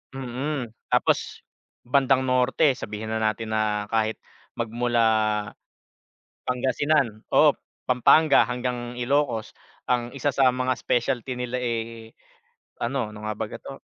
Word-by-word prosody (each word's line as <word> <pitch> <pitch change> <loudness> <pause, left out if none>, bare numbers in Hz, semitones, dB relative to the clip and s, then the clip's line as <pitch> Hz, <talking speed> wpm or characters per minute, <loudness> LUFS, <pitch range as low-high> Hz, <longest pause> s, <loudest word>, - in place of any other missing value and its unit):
Mm, 130 0 -4 0.2
tapos - - +1 0.4
bandang 130 +1 +3
norte, 130 +3 +3
sabihin 110 +1 -5
na 110 - -1
natin 110 0 -1
na 105 -1 0
kahit 110 -1 +1 0.4
magmula 120 +1 0 1.4
Pangasinan 130 -2 0
oo, - - +5 0.3
Pampanga 140 +4 +5
hanggang 125 -1 -3
Ilocos, 125 -3 0 0.4
ang 120 -1 0
isa 140 +1 0
sa 130 -2 +3
mga 130 0 0
specialty 120 +1 -1
nila 125 0 -3
eh 115 -2 -4 0.7
ano, 120 -2 -2
ano 105 0 -8
nga 110 - -1
baga 105 0 -5
'to? - - -10
120 Hz, 115 wpm, -25 LUFS, 110-130 Hz, 1.4 s, oo